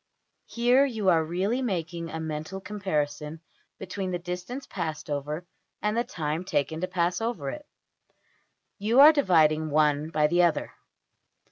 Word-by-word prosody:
Here 245 +3 +3
you 220 -8 0
are 165 -2 +4
really 190 +10 -1
making 170 -7 -3
a 160 - -5
mental 160 +4 -5
comparison 160 -6 -3 0.4
between 195 -2 -4
\DPPageSep{067.png}% - - -3
the - - 0
distance 180 +10 -5
passed 160 -5 -5
over 150 +4 -3 0.3
and 210 +1 -1
the 235 - +2
time 155 -4 -3
taken 160 -3 -1
to 185 - -1
pass 180 +1 0
over 210 - -2
it. 300 0 -9 1.1
You 220 +5 +2
are 300 +3 +10
dividing 160 - +3
one 150 0 +2
by 155 -2 +2
the 175 +4 +3
other. 170 -2 +1
175 Hz, 150 wpm, -27 LUFS, 155-205 Hz, 1.1 s, are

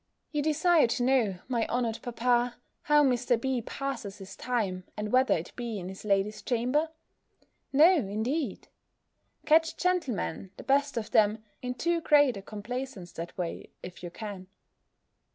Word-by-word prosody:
You 300 -2 0
desire 310 0 +4
to 240 +1 -1
know, 245 -7 +2
my 235 -3 0
honoured 235 -2 -1
papa, 245 0 +1 0.3
how 295 0 +4
Mr. 245 -3 +2
B. 260 0 -1
passes 235 -5 -5
his 195 -1 -10
time, 205 -7 -2
and 210 0 -3
whether 255 +1 +4
it 165 - -8
be 235 -3 -4
in 180 -1 -5
his 190 - -9
lady's 205 0 +1
chamber? 255 +6 +1 0.8
No, 320 +7 +7
indeed! 230 +3 -2 0.8
Catch 325 +2 +4
gentlemen, 300 - -1
the - - -9
best 280 -1 +2
of 220 -2 -3
them, 215 0 +3 0.2
in 250 0 -3
too 340 +6 0
great 290 -6 +5
a 195 - -6
complaisance 215 -1 -6
that 170 +1 -7
way, 175 -2 -4
if 180 0 -9
you 175 - -5
can. 195 -1 -7
245 Hz, 150 wpm, -29 LUFS, 205-275 Hz, 0.8 s, No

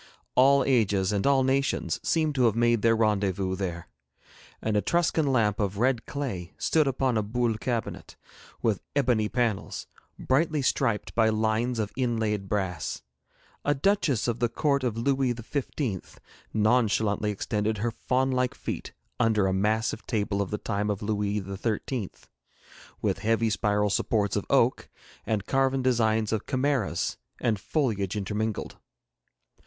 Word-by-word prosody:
All 135 +1 +5
ages 105 -7 +2
and 100 +4 0
all 135 -1 +4
nations 135 +1 0
seemed 155 -2 +1
to 130 -3 +2
have 110 -2 +3
made 120 -1 +3
their 115 +1 +4
rendezvous 100 -4 +1
there. 90 -3 -4 0.7
An 110 -1 -1
Etruscan 160 +6 +2
lamp 105 -4 +2
of 100 -2 -1
red 125 +1 +1
clay 100 -12 -4
stood 155 -3 +2
upon 130 -2 +1
a - - +2
Boule 115 +2 0
cabinet, 120 -2 -3 0.5
with 110 -4 +1
ebony 125 -7 +2
panels, 115 -5 -1 0.3
brightly 150 +2 +1
striped 115 -5 0
by 110 -1 +3
lines 110 +3 0
of 105 -2 -2
inlaid 110 -6 -1
brass; 95 -9 -2 0.6
a 145 - +2
duchess 145 - +1
of 120 -1 -1
the 120 0 +1
court 140 +1 +1
of 120 -3 -1
Louis 130 0 +1
xv. 120 - -4 0.3
nonchalantly 110 -2 +2
extended 105 +1 -1
her 115 +4 -1
fawn 130 +3 0
like 125 -1 0
feet - - -5 0.3
under 110 -3 +3
a 95 - +1
massive 110 +3 0
table 100 -3 0
of 100 - -2
the 105 - -2
time 105 +1 -2
of 105 0 -2
Louis 105 -1 0
xiii., 100 +3 -3 0.9
with 100 -2 0
heavy 115 +1 +1
spiral 105 0 +1
supports 105 -1 +1
of - - -2
oak, - - +2 0.4
and 105 -3 -1
carven 135 -1 +1
designs 110 -4 +2
of 110 - -2
chimeras 130 -9 0 0.2
and 110 -5 0
foliage 110 - -1
intermingled. 105 +1 -3
110 Hz, 145 wpm, -27 LUFS, 105-130 Hz, 0.9 s, All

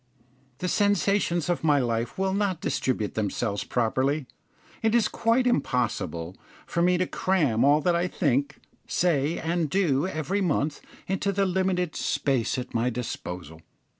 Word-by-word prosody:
The 180 - -3
sensations 200 -4 +1
of 175 -1 -1
my 150 -2 +4
life 120 -2 -1
will 190 0 0
not 195 -4 0
distribute 120 -10 -1
themselves 105 0 -1
properly. 130 +5 0 0.6
It 225 +1 +2
is 225 -3 +4
quite 230 +3 +1
impossible 110 - -1 0.3
for 170 - -1
me 180 +1 +4
to 185 - +1
cram 150 -13 +1
all 145 +2 +5
that 175 +2 +2
I 175 +1 +1
think, 140 -4 0 0.3
say, 160 -3 +1
and 165 -1 -1
do 160 -3 +2
every 185 +3 -2
month 150 -4 0 0.2
into 195 +1 -1
the 195 0 +1
limited 185 -2 0
space 130 -4 0
at 125 0 -5
my 115 +2 +1
disposal. 90 -9 -6
155 Hz, 145 wpm, -26 LUFS, 125-185 Hz, 0.6 s, all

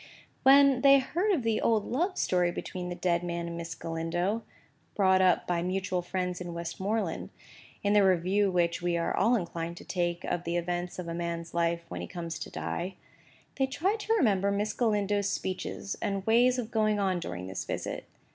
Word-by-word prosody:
When 275 -1 +6
they 275 +1 +8
heard 345 +10 0
of 320 -11 +1
the 225 -1 +1
old 220 -3 +2
love 355 +9 -1
story 180 -1 +2
between 180 0 -5
the 175 - -4
dead 175 -1 0
man 170 -1 -3
and 170 0 -5
Miss 170 0 -5
Galindo,—brought 185 +3 -1
up 185 -2 +3
by 175 -1 0
mutual 185 0 -1
friends 180 0 -3
in 175 -1 -5
Westmoreland, 190 +2 -2 0.5
in 205 0 +2
the 205 -1 +6
review 190 +2 +3
which 175 -1 +1
we 175 -1 0
are 170 - 0
all 240 +2 +3
inclined 170 -4 -3
to - - -11
take 175 -1 -1
of 175 - -2
the 170 +1 -1
events 175 +1 -3
of 180 -2 -5
a 170 - -3
man's 170 0 -4
life 170 0 0
when - - -6
he - - -5
comes 170 -2 -5
to - - -6
die,—they 190 +8 -5
tried 380 +11 0
to 435 +2 0
remember 200 - +3
Miss 205 +1 0
Galindo's 205 -3 +1
speeches 190 +1 -3
and 195 -1 -2
ways 245 +3 +4
of 240 -2 -4
going 215 -2 +2
on 190 -3 +1
during 90 - -5
this 95 0 -4
visit. - - -4
185 Hz, 185 wpm, -29 LUFS, 170-215 Hz, 0.5 s, they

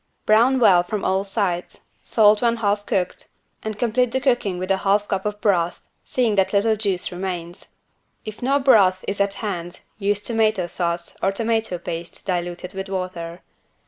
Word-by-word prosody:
Brown 235 +5 +4
well 190 -7 +6
from 195 +3 -4
all 190 +1 +1
sides, 195 -3 -2 0.2
salt 210 -1 +4
when 235 -1 +3
half 205 -2 -1
cooked 185 -2 -2 0.3
and 215 -1 -5
complete 240 +2 +1
the 260 - 0
cooking 245 -8 +1
with 185 +2 -3
a 195 - +3
half 200 +2 +1
cup 190 +2 -1
of 210 0 -4
broth, 175 -6 +1 0.2
seeing 240 -4 0
that 190 0 +2
little 220 +2 +3
juice 200 -4 -2
remains. 175 -1 -6 0.5
If 215 -1 -8
no 270 +3 +2
broth 200 -9 +4
is 200 0 -1
at 200 0 0
hand, 175 -5 -5 0.2
use 205 0 0
tomato 220 -5 +1
sauce, 170 0 -3
or 195 - +2
tomato 220 -2 -1
paste 170 0 -7
diluted 175 0 -3
with 195 0 -5
water. 180 -3 -5
200 Hz, 170 wpm, -22 LUFS, 180-220 Hz, 0.5 s, well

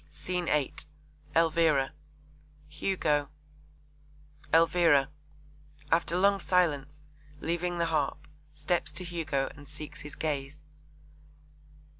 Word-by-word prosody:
SCENE 180 -1 -3
VIII. 145 -3 +1 0.6
ELVIRA. 160 -4 +3 0.8
HUGO. 150 -3 0 1.2
ELVIRA 165 -4 +5 0.8
(after 170 +1 +2
long 200 +1 +4
silence, 150 -6 +1 0.4
leaving 175 +2 -1
the 170 - +1
harp, 150 -2 -1 0.2
steps 150 +3 -1
to 175 +4 -5
Hugo, 160 -6 -2
and 145 0 -13
seeks 150 +1 -9
his 150 - -9
gaze). 145 -1 -3
155 Hz, 90 wpm, -29 LUFS, 145-170 Hz, 1.2 s, ELVIRA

